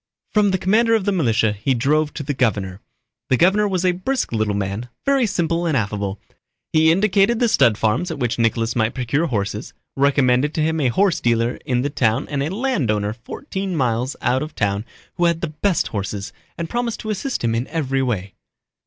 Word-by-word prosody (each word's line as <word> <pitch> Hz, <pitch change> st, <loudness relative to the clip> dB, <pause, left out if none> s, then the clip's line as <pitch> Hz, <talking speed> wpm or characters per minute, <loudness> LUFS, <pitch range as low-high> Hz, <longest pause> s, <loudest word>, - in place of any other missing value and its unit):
From 210 Hz, -1 st, +3 dB
the 190 Hz, -, +1 dB
commander 225 Hz, +5 st, +3 dB
of 210 Hz, -4 st, 0 dB
the 205 Hz, -, +2 dB
militia 115 Hz, -, +2 dB
he 110 Hz, +6 st, 0 dB
drove 150 Hz, +5 st, +1 dB
to 150 Hz, -, -4 dB
the 145 Hz, +1 st, -2 dB
governor. 100 Hz, -7 st, -1 dB, 0.5 s
The 130 Hz, -, +3 dB
governor 195 Hz, +6 st, +4 dB
was 185 Hz, -2 st, -1 dB
a 180 Hz, -, +4 dB
brisk 240 Hz, +9 st, -2 dB
little 110 Hz, -3 st, 0 dB
man, 100 Hz, +4 st, -3 dB, 0.2 s
very 275 Hz, -4 st, +3 dB
simple 170 Hz, -2 st, 0 dB
and 155 Hz, -4 st, +2 dB
affable. 100 Hz, -2 st, -2 dB, 0.5 s
He 160 Hz, 0 st, +5 dB
indicated 200 Hz, +4 st, +3 dB
the 240 Hz, -, +3 dB
stud 120 Hz, -, +4 dB
farms 115 Hz, -, 0 dB
at 160 Hz, -, -4 dB
which 120 Hz, -3 st, -1 dB
Nicholas 115 Hz, 0 st, +1 dB
might 110 Hz, -1 st, 0 dB
procure 135 Hz, +6 st, 0 dB
horses, 105 Hz, -3 st, -3 dB, 0.2 s
recommended 140 Hz, 0 st, +2 dB
to 155 Hz, -, +1 dB
him 160 Hz, 0 st, 0 dB
a 135 Hz, -, +3 dB
horse 185 Hz, +8 st, +2 dB
dealer 115 Hz, 0 st, +1 dB
in 125 Hz, -1 st, +1 dB
the 145 Hz, -, -1 dB
town 120 Hz, 0 st, +1 dB
and 140 Hz, -2 st, -1 dB
a 145 Hz, -, -1 dB
landowner 135 Hz, -, 0 dB
fourteen 190 Hz, -, -5 dB
miles 125 Hz, -1 st, 0 dB
out 130 Hz, +2 st, +2 dB
of 155 Hz, +1 st, -6 dB
town 100 Hz, +1 st, -1 dB, 0.3 s
who 175 Hz, -, +2 dB
had 170 Hz, -1 st, +1 dB
the 170 Hz, -, -2 dB
best 195 Hz, -5 st, +1 dB
horses, 100 Hz, -1 st, -4 dB, 0.2 s
and 170 Hz, -, -3 dB
promised 240 Hz, +3 st, -2 dB
to 215 Hz, -, -3 dB
assist 215 Hz, -, -3 dB
him 115 Hz, -1 st, +1 dB
in 115 Hz, +3 st, -1 dB
every 135 Hz, -4 st, -1 dB
way. 100 Hz, -7 st, -2 dB
140 Hz, 200 wpm, -21 LUFS, 115-180 Hz, 0.5 s, He